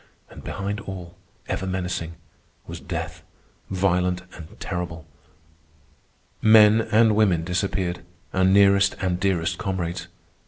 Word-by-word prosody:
And - - -12
behind 100 +2 -4
all, 90 -4 -8 0.3
ever 95 - -3
menacing, 90 -3 -3 0.5
was - - -8
death, - - -5 0.5
violent 90 -1 0
and 80 -2 -12
terrible. 85 -2 -5 1.4
Men 110 0 +7
and 110 -1 +5
women 95 -6 +3
disappeared, 90 0 -2 0.3
our 95 - +2
nearest 100 +1 +5
and 90 -2 -1
dearest 90 -4 0
comrades. 85 -2 -3
95 Hz, 110 wpm, -24 LUFS, 90-100 Hz, 1.4 s, Men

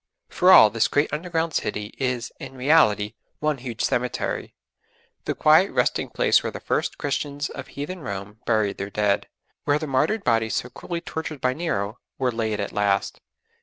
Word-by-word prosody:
For 180 +1 +4
all 110 - +9
this 115 +1 +2
great 145 +2 +1
underground 165 0 -1
city 105 0 -2
is 125 -3 -1
in 135 - -9
reality 125 -7 +3 0.2
one 150 -2 -1
huge 120 -3 -4
cemetery: 125 0 -2 0.7
the - - -1
quiet - - +5
resting - - 0
place - - +3
where - - -3
the - - -7
first - - -1
Christians 145 +1 -2
of 135 - -8
heathen 165 +6 -6
Rome 100 - -6
buried 110 -3 +1
their 100 +1 -3
dead, 105 -1 +1 0.4
where 145 0 +3
the 155 - -4
martyred 155 +10 +1
bodies 115 -1 +1
so 125 - -3
cruelly 170 +6 -5
tortured 160 -3 -5
by 125 0 +1
Nero 120 - -2 0.2
were 130 -2 +1
laid 110 -2 -2
at 100 - -3
last. 100 -1 0
125 Hz, 170 wpm, -24 LUFS, 105-150 Hz, 0.7 s, all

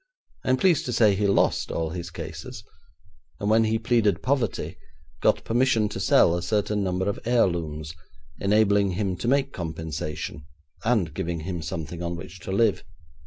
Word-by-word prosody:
I - - -2
am 130 - +4
pleased 175 0 +3
to 125 - -2
say 110 -3 +5
he 100 +1 +1
lost 100 - +2
all 80 -1 -2
his 85 0 -5
cases, - - -8 0.8
and 100 +1 0
when 110 +1 +5
he 110 +1 +1
pleaded 110 -5 +1
poverty, 130 -6 -1 0.4
got - - +3
permission 115 -3 +2
to - - -5
sell 85 - +4
a 90 - -2
certain 105 +1 0
number 95 0 -1
of 100 - -1
heirlooms, 85 -10 0 0.5
enabling 100 -1 +3
him 95 -1 -1
to 115 - -4
make 140 +1 +2
compensation, 80 -3 -5 0.4
and 105 -9 +1
giving 85 +1 -3
him 85 0 -4
something 80 +1 -5
on 85 0 -2
which 90 +2 -9
to 90 - -6
live. 105 +1 +2
100 Hz, 165 wpm, -25 LUFS, 85-110 Hz, 0.8 s, say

